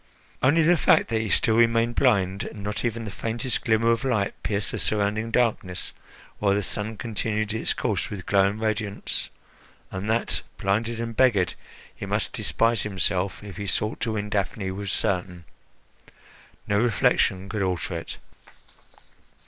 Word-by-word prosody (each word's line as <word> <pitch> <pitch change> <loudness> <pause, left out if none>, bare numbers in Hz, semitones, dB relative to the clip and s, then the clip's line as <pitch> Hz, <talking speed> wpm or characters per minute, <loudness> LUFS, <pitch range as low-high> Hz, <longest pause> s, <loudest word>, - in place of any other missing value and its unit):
Only 155 +5 +4
the 175 +2 +5
fact - - +4
that 110 -1 +1
he 110 - -3
still 110 - +3
remained 115 0 +3
blind, 100 -7 +2
and 105 -3 -7
not 105 +1 -2
even 115 -1 -2
the 105 - -5
faintest 115 +7 -2
glimmer 115 0 +3
of 115 +3 0
light 110 -7 +1
pierced 105 -1 -1
the - - -3
surrounding 105 +1 0
darkness, 110 -7 0 0.5
while 100 -1 +3
the 105 - 0
sun 105 +3 -3
continued 110 -1 -2
its 110 - 0
course 105 -8 -1
with 95 -4 -6
glowing 100 +1 +3
radiance, 110 -2 -2 0.6
and 95 +3 -4
that, 115 +1 +1 0.2
blinded 115 +4 0
and 115 -1 -4
beggared, 105 -10 +3 0.4
he - - -6
must - - -1
despise 115 0 +1
himself 95 -1 -1
if 100 -3 -9
he 100 -1 -4
sought 105 +3 -1
to 110 - -1
win 105 -1 -3
Daphne, 100 -1 -1
was 100 0 -4
certain. 90 -3 -1 1.2
No 100 0 +2
reflection 100 -4 +2
could 105 0 -3
alter 90 -1 -1
it. 80 - -6
105 Hz, 155 wpm, -25 LUFS, 100-115 Hz, 1.2 s, the